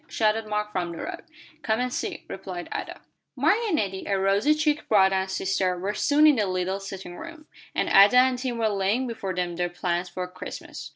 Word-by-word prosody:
shouted 220 0 0
Mark 210 0 -2
from 175 -3 -2
the 170 - -8
road. - - -6 0.4
"Come 220 -4 0
and 250 0 -1
see," - - -4
replied 185 -2 -6
Ada. - - -6 0.3
Mark 410 - +3
and 380 - +1
Nettie, 195 -8 -2
a 195 - +1
rosy 200 +10 +3
cheeked 300 -1 0
brother 195 -3 +5
and 190 0 -1
sister, 190 -1 0
were 195 +4 -2
soon 295 +6 +3
in 300 -4 +6
the 210 -2 +1
little 185 +1 -1
sitting 190 -2 -8
room, 325 -2 -10 0.3
and - - +1
Ada 200 +5 +7
and 255 0 +4
Tim 250 -2 -3
were 225 -1 +1
laying 205 +5 0
before 200 -6 -4
them 175 -1 -2
their 175 0 0
plans 175 0 -2
for 180 0 -4
Christmas. 180 0 -8
195 Hz, 210 wpm, -25 LUFS, 185-245 Hz, 0.4 s, Ada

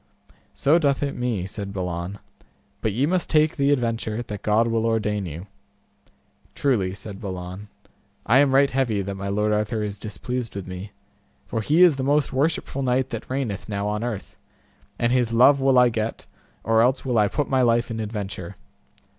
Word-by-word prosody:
So 155 +5 +3
doth 140 -3 +1
it 140 - -2
me, 120 -7 -2
said 100 +1 -6
Balan, 90 0 -4 0.6
but 110 - 0
ye 125 +7 +1
must 180 +3 0
take 155 -1 +3
the 140 -1 +2
adventure 115 -3 -1
that 105 -3 -7
God 110 +2 +2
will 115 0 0
ordain 105 -3 0
you. 85 +3 -7 1.1
Truly, 100 -10 +1
said 100 -1 -9
Balin, 95 0 -6 0.6
I 120 +5 +5
am 140 -2 +4
right 140 0 +5
heavy 120 -7 0
that 100 +1 -4
my 100 0 -5
Lord 105 +1 +1
Arthur 105 +1 -1
is 105 -1 -5
displeased 115 +3 -5
with 100 -2 -5
me, 95 +2 -7 0.5
for 115 - -3
he 155 - +4
is 165 -6 +5
the 130 - -2
most 145 +1 +1
worshipful 140 0 0
knight 130 0 0
that 115 - -6
reigneth 125 -8 -3
now 100 -1 -2
on 105 +1 -2
earth, 120 -5 -5 0.6
and 120 0 +1
his 125 -2 +1
love 135 +4 +6
will 135 -1 +4
I 125 -1 +6
get 110 0 -3 0.4
or 115 0 +3
else 130 +3 +2
will 125 -4 +2
I 105 - +4
put 145 +7 -1
my 130 -1 +2
life 120 -1 +2
in 110 - -4
adventure. 100 -4 -5
115 Hz, 185 wpm, -24 LUFS, 100-130 Hz, 1.1 s, love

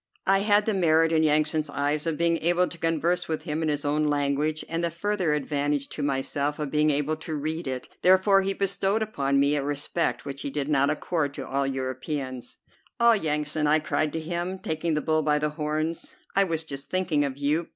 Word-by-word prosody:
I 195 0 +4
had 205 +1 +3
the 220 - +1
merit 165 -3 +3
in 160 -1 +3
Yansan's 155 0 +1
eyes 145 +2 -1
of 160 -2 -1
being 170 0 +2
able 175 +3 +2
to 170 - -9
converse 165 +2 0
with 160 -1 -3
him 155 +1 -3
in 160 - 0
his 145 -1 -2
own 150 +1 +1
language, 145 +1 0
and 165 +1 -2
the 170 - +2
further 180 -1 -1
advantage 145 -1 -1
to - - -5
myself 140 +1 -1
of 150 -3 -4
being 150 0 +3
able 150 +1 0
to 160 0 -5
read 155 +2 -3
it; 130 -1 -4
therefore 190 +2 +5
he 195 0 -1
bestowed 195 +2 +1
upon 140 -10 0
me 140 +1 +3
a 145 - 0
respect 145 +4 -2
which 140 -1 -6
he - - -2
did 145 +1 -3
not 140 -1 +3
accord 150 -1 -1
to 135 - -6
all 140 0 0
Europeans. 130 0 -4 0.4
"Ah, 235 0 +6
Yansan!" 150 -4 0
I 150 +1 +5
cried 155 0 -1
to 160 - -2
him, 175 +3 -3
taking 160 -2 -2
the 150 - 0
bull 155 0 +1
by 150 -1 +2
the 150 0 0
horns, 155 +2 -3 0.2
"I 195 0 +4
was 165 -3 0
just 140 -3 -5
thinking 180 -6 +1
of 140 -2 -3
you. 150 +4 0
155 Hz, 215 wpm, -26 LUFS, 145-170 Hz, 0.4 s, Ah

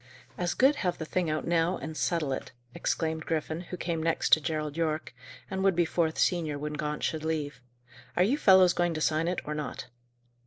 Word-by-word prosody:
"As 175 -1 -1
good 275 +3 +4
have 180 -7 -1
the 160 - -5
thing 175 +1 -1
out 155 0 -1
now, 170 +1 +1
and 155 +3 -6
settle 155 -4 0
it," - - -6 0.2
exclaimed 160 +2 -2
Griffin, 160 0 -2
who 180 +1 -7
came 170 -2 -2
next 165 +1 +1
to 155 - +7
Gerald 150 -1 -3
Yorke, 155 -4 -2 0.3
and 190 0 -3
would 195 -2 +3
be 175 0 +3
fourth 160 -1 0
senior 160 -5 +1
when 150 +1 -4
Gaunt 150 0 -3
should 155 -1 -1
leave. 155 -4 -3 0.6
"Are 180 - +5
you 225 +9 +3
fellows 185 -5 +6
going 175 -1 0
to 155 - -3
sign 155 +2 +1
it, 180 0 -1
or 150 - -3
not?" 150 -5 -5
160 Hz, 205 wpm, -29 LUFS, 155-175 Hz, 0.6 s, to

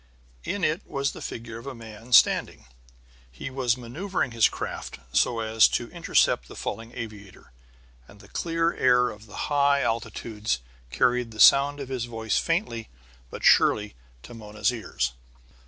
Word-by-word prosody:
In 200 -2 -3
it 160 +5 +1
was 140 0 -1
the - - -11
figure 115 0 -7
of 120 - -12
a 135 - -6
man 115 +1 -12
standing; 120 - +4 0.7
he 65 - -7
was 130 -3 0
maneuvering 130 +5 -3
his 115 -1 +4
craft - - -6 0.2
so 115 -2 +2
as 110 0 +5
to - - -3
intercept - - +1
the - - -12
falling 115 +1 -5
aviator. 105 - -9 0.6
And - - -17
the - - -16
clear 165 0 -1
air 125 -1 +3
of 105 +1 -13
the 105 - -12 0.2
high 140 -1 +3
altitudes 110 - -2 0.3
carried 120 - +1
the 110 -1 -12
sound 140 +5 +6
of 135 -2 -6
his 125 -3 -3
voice 115 -2 -1
faintly 165 - -2 0.4
but - - -9
surely 105 -1 +4 0.3
to - - -11
Mona's 105 -1 -2
ears. 110 - -3
115 Hz, 155 wpm, -26 LUFS, 110-140 Hz, 0.7 s, sound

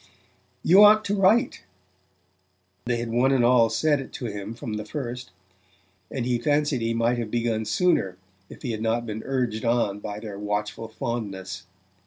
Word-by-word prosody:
"You 190 +5 +7
ought 215 +1 +7
to 200 - 0
write"; 205 +4 +2 1.2
they 120 -1 0
had 115 -1 -4
one 125 +3 +3
and 130 -3 +3
all 120 -2 +5
said 145 +6 +1
it 135 - -8
to 125 - -6
him 105 0 -5
from 115 -1 -6
the 105 0 -3
first; 125 -4 -6 0.8
and 130 -3 -3
he 120 -1 0
fancied 145 0 +1
he 115 0 -1
might 115 +1 +1
have 115 -2 -3
begun 115 -1 -1
sooner 105 - +1 0.3
if - - -13
he 125 - -2
had 110 -1 -4
not 115 +1 0
been 110 -1 -5
urged 125 -5 -2
on 115 -4 +1
by 105 0 -6
their 105 -2 -7
watchful 105 +1 -3
fondness. 95 -5 -5
115 Hz, 175 wpm, -25 LUFS, 105-130 Hz, 1.2 s, You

